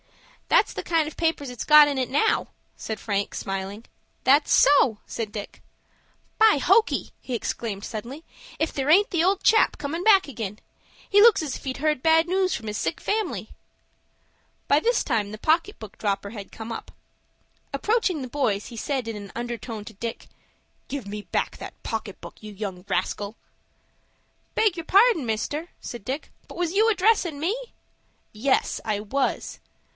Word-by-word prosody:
"That's - - +3
the - - -5
kind 330 -3 +1
of 310 - -8
papers 320 -5 -1
it's 245 - -5
got 300 -1 +8
in 285 -2 -1
it 255 - -1
now," 295 +12 +2 0.3
said 220 -2 -5
Frank, 200 -2 -2
smiling. 195 +3 -5 0.4
"That's 280 +3 +4
so!" 275 -6 +5
said 220 -3 -5
Dick. 205 -1 -7 0.8
"By 440 -6 +6
hokey!" 410 - +2
he 255 - -4
exclaimed 215 -3 -4
suddenly, 240 +8 -7 0.3
"if 315 - 0
there 275 +1 -2
aint 405 +8 +5
the 340 -3 +2
old 385 +2 +2
chap 445 - +4
comin' 300 +4 -4
back 390 -4 +5
ag'in. 220 -6 -5 0.5
He 410 0 +5
looks 450 -4 +7
as 285 -4 -3
if - - -9
he'd 260 -1 -4
heard 300 -2 0
bad 325 +1 +4
news 375 +1 +1
from 220 - -5
his 210 0 -3
sick 160 0 -2
family." 425 -2 -2 1.2
By 285 - +5
this 475 +7 +1
time 215 -6 -1
the 215 - -7
pocket 330 - +1
book 215 -3 -10
dropper 200 -1 -2
had 205 -3 -9
come 225 +1 -8
up. - - -7 0.8
Approaching 370 - 0
the 255 - -5
boys, 230 -7 -1
he 235 - -10
said 265 0 -2
in 225 - -4
an 205 -1 -8
undertone 235 -2 -5
to 220 - -10
Dick, 230 +3 -6 0.6
"Give 275 -6 -5
me 210 +1 -5
back - - -2
that - - -10
pocket 220 -3 -4
book, 170 - -11
you 215 -1 -9
young 195 -3 -6
rascal!" 205 +2 -2 1.2
"Beg 430 -5 +3
your 335 -2 -6
pardon, 400 - +4
mister," 290 +10 -2
said 240 -4 -8
Dick, 265 +7 -5 0.2
"but - - -11
was 345 -1 -1
you 435 +3 +4
addressin' 380 -7 +2
me?" 350 +9 0 0.8
"Yes, 260 +6 0
I 215 -2 -1
was." 260 +7 -2
270 Hz, 170 wpm, -25 LUFS, 215-335 Hz, 1.2 s, got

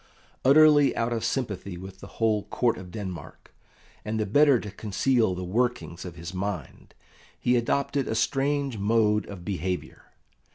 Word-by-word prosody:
Utterly 145 +1 +6
out 115 +1 0
of 115 -1 -2
sympathy 100 -7 -3
with 95 +1 -10
the - - -10
whole 110 -2 +1
Court 120 -2 +1
of 90 -1 -10
Denmark, 90 -5 -8 0.5
and 110 +1 -3
the 110 - 0
better 140 +4 +4
to 105 - -7
conceal 110 +1 +1
the 90 - -5
workings 110 -3 -2
of 90 -2 -8
his 85 +1 -8
mind, 95 -6 -5 0.4
he 125 - +2
adopted 140 +3 0
a 110 - -1
strange 135 0 0
mode 105 0 +2
of 95 -4 -9
behaviour. 90 -2 -4
110 Hz, 155 wpm, -26 LUFS, 95-125 Hz, 0.5 s, Utterly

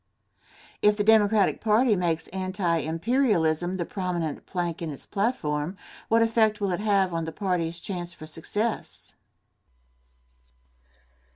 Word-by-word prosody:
If 210 0 +4
the 205 - +1
Democratic 215 -2 +4
party 220 +1 +3
makes 170 -3 0
anti 185 -2 -1
imperialism 175 - +1
the 175 - -2
prominent 175 -6 -3
plank 175 -2 -3
in 165 - -3
its 145 - -8
platform, 180 -6 -1 0.3
what 230 +1 +4
effect 220 -2 +2
will 200 -2 0
it 175 - -1
have 200 -4 +2
on 165 -1 -1
the 160 - -4
party's 175 -3 -1
chance 175 -2 -5
for 155 - -10
success? 205 +8 -4
185 Hz, 125 wpm, -26 LUFS, 165-210 Hz, 0.3 s, If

